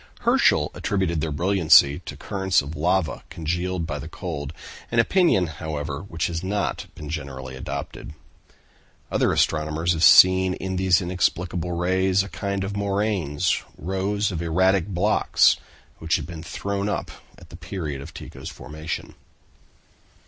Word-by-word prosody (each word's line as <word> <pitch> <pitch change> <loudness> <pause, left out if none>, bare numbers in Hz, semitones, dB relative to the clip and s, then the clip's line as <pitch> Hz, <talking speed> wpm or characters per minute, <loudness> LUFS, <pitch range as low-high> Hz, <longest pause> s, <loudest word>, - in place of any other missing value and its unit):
Herschel - - +3
attributed 90 -5 -1
their 80 0 -2
brilliancy 80 -3 +5
to - - -6
currents 95 -5 0
of 75 +3 -7
lava 90 +2 0
congealed 85 +2 -2
by 75 -3 -4
the 75 - -7
cold; 80 -5 -5 0.4
an 115 - -2
opinion, 115 - +4
however, 75 -2 -5
which 85 -4 -3
has 85 0 -3
not 100 +1 -2
been 75 - -8
generally 70 -4 -6
adopted. 70 +3 -6 1.0
Other - - +2
astronomers 80 +2 +1
have 80 - -3
seen 95 +2 +7
in 95 0 -4
these 95 0 +3
inexplicable 90 -1 -1
rays 95 +2 +2
a 100 - -8
kind 100 +2 -3
of 100 +1 -4
moraines, 100 -7 0 0.2
rows 95 +4 -1
of 85 -3 -3
erratic 95 +3 +2
blocks, 100 +2 +3 0.4
which 80 +1 +1
had 75 - -2
been 80 0 -8
thrown 100 +4 -3
up - - -3 0.3
at - - -16
the - - -10
period 75 -4 -5
of - - -9
Tycho's - - -9
formation. 80 +3 -6
90 Hz, 140 wpm, -24 LUFS, 80-95 Hz, 1.0 s, seen